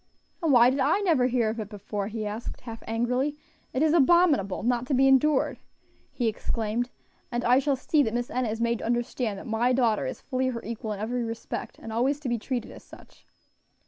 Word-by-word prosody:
"And 325 -3 +2
why 245 -1 +7
did 275 - -2
I 400 - +2
never 315 -11 +3
hear 240 -3 +1
of 225 +1 -4
it 210 -2 -5
before?" 205 -1 -4
he 215 0 -4
asked, 210 +3 -5
half 230 -2 -8
angrily. 250 +6 0 0.3
"It 260 - 0
is 315 0 +3
abominable! 310 - +4
not 245 +1 0
to 275 - +1
be 270 +1 +5
endured!" 270 +2 +3 0.5
he 240 - -1
exclaimed, 225 +2 -2 0.4
"and 240 0 -1
I 250 +2 +5
shall 275 0 +1
see 290 +3 +2
that 225 -5 0
Miss 240 0 -2
Enna 250 -2 0
is 220 +1 -3
made 235 0 +1
to - - -6
understand 240 -2 -1
that - - -9
my 235 +3 +1
daughter 235 -4 +2
is - - -5
fully 260 -1 -1
her 235 -3 -3
equal 225 0 -5
in 200 - -7
every 240 +3 -2
respect, 230 0 -5
and 225 - -8
always 265 +5 +1
to 270 - -3
be 240 -1 0
treated 245 +1 -4
as - - -12
such." - - -17
240 Hz, 215 wpm, -27 LUFS, 225-265 Hz, 0.5 s, why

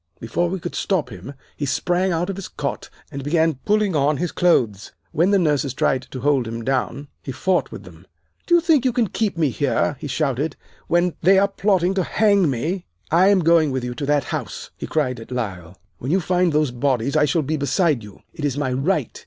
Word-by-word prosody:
"Before 170 +10 -1
we 190 +1 -3
could 175 - -6
stop 160 - -1
him 95 +8 -9 0.2
he 145 - -3
sprang 180 +7 0
out 170 +1 0
of - - -6
his 195 -1 -6
cot 140 -1 -5 0.2
and 140 -2 -6
began 160 -1 +1
pulling 210 -4 +2
on 145 +1 +2
his 175 +3 -2
clothes. 115 - +1 0.2
When 170 +5 +2
the 200 - +4
nurses 145 -7 +1
tried 130 -1 0
to 130 - -7
hold 135 -3 +2
him 115 0 -5
down, 135 +2 -2
he 135 - -6
fought 185 +7 0
with - - -8
them. - - -15 0.4
"'Do 345 - +5
you 345 - +5
think 320 -6 +3
you 255 -2 +1
can 235 -5 +1
keep 210 -5 -1
me 155 -4 +2
here,' 145 +1 0
he - - -5
shouted, 145 +1 -1 0.3
'when 175 0 +2
they 190 +3 +5
are 200 +1 +4
plotting 195 -2 +1
to 190 -1 0
hang 200 -6 +3
me? 160 +9 -2 0.2
I 175 +4 +5
am 200 -2 +4
going 165 -2 +4
with 130 -2 -2
you 125 0 -3
to 140 +3 -5
that 145 -2 +2
house!' - - -5
he - - -6
cried 130 -6 -1
at 115 - -11
Lyle. 95 -8 -5 0.2
'When 130 - -5
you 185 +5 +3
find 180 0 +1
those 150 -3 +1
bodies 130 +1 0
I 150 -1 +4
shall 155 +2 +1
be 155 +3 -1
beside 150 - +1
you. 105 -2 -13
It 155 - -8
is 145 -2 -1
my 135 -3 -1
right. 140 - -1
150 Hz, 225 wpm, -21 LUFS, 130-180 Hz, 0.4 s, Do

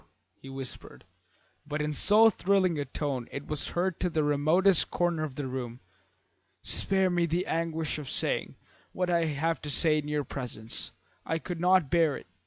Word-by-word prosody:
he 135 - -13
whispered, 135 -1 -6 0.6
but 150 +1 -4
in 150 0 -1
so 210 +9 +6
thrilling 185 -4 +1
a 145 - -2
tone 135 -2 -3
it 140 - -6
was 150 -2 -3
heard 185 -1 0
to 180 - 0
the 155 -2 0
remotest 155 +6 +3
corner 175 -3 0
of 145 -4 -5
the 145 - -4
room. 125 -2 -5 0.8
"Spare 190 -1 +2
me 175 -1 +1
the 170 +3 -1
anguish 160 -1 -2
of 145 - -7
saying - - -2 0.4
what 180 -1 -1
I 170 -1 +2
have 160 +2 -1
to 150 - -6
say 155 +2 +3
in 150 - -6
your 150 -1 -1
presence. 120 -5 -6 0.3
I 160 - -1
could 170 +1 -6
not 180 -4 +3
bear 165 -4 +3
it. - - -12
155 Hz, 180 wpm, -29 LUFS, 145-175 Hz, 0.8 s, so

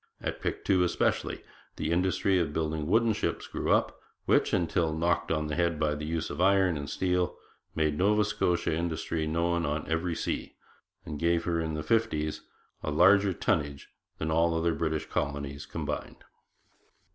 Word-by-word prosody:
At - - -4
Pictou, 95 -2 +1
especially, 90 - 0 0.3
the - - -2
industry 95 +2 +2
of 80 -4 -1
building 80 -1 -1
wooden 115 +4 +3
ships 105 - -2
grew - - -2
up, - - +2 0.3
which, - - +3
until 80 -2 +1
knocked 85 +1 +1
on 75 -1 0
the 75 - -3
head 85 -2 0
by 75 -1 +1
the 75 0 -5
use 80 0 -2
of 75 - -3
iron 95 -2 +4
and 70 -1 -5
steel, 90 -1 0 0.4
made 75 -2 0
Nova 105 +2 +3
Scotian 90 -5 0
industry 80 -1 -2
known 85 +2 0
on 75 -1 -2
every 80 +1 -1
sea, - - -3 0.5
and 75 - -5
gave 85 0 +2
her 85 -1 0
in 80 -1 -2
the 75 - -3
fifties 80 -10 0 0.4
a - - -3
larger 95 +6 +5
tonnage 70 -5 -1 0.3
than 80 0 -2
all 85 +1 +3
the - - 0
other 85 0 +1
British 80 -1 -1
colonies 70 -1 -3
combined. - - -5
80 Hz, 170 wpm, -29 LUFS, 75-90 Hz, 0.5 s, larger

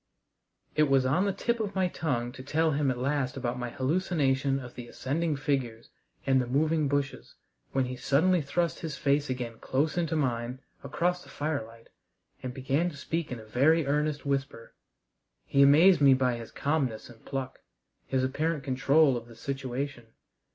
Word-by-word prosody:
It 150 -1 +3
was 135 -1 +4
on 155 +10 +2
the 200 - +1
tip 235 +5 -1
of 210 -3 -3
my 190 -1 +2
tongue 130 -9 -2
to 130 - -10
tell 160 +4 +1
him 145 -1 +1
at 125 - -1
last 135 0 -1
about 125 -1 -2
my 125 -1 -3
hallucination 135 -1 +1
of 125 -2 -9
the 120 -1 -8
ascending 150 +6 -2
figures 135 -5 -2 0.3
and 135 -1 +4
the 125 - -4
moving 155 +3 +1
bushes, 140 0 -2 0.4
when 135 -1 +1
he 125 0 -5
suddenly 165 +8 +2
thrust 170 +4 -1
his 160 -3 -5
face 145 0 +1
again 120 -3 -4
close 150 +6 0
into 165 -2 -1
mine 125 -3 -1 0.2
across 180 +1 -1
the - - -16
firelight 115 -7 -4 0.5
and 130 - -4
began 135 +7 0
to 150 - -11
speak 165 +1 -3
in 125 - -4
a 110 - -11
very 145 +8 +3
earnest 150 +1 0
whisper. 135 -4 -3 0.7
He 140 - +2
amazed 155 +5 +7
me 135 -2 +7
by 125 -2 +1
his 115 -1 -8
calmness 140 -7 -1
and 115 -2 -16
pluck, 135 -2 -5 0.5
his 130 -1 0
apparent 150 +3 -1
control 135 +2 +3
of 120 -1 -6
the 115 - -13
situation. 135 -1 -4
140 Hz, 175 wpm, -29 LUFS, 130-155 Hz, 0.7 s, amazed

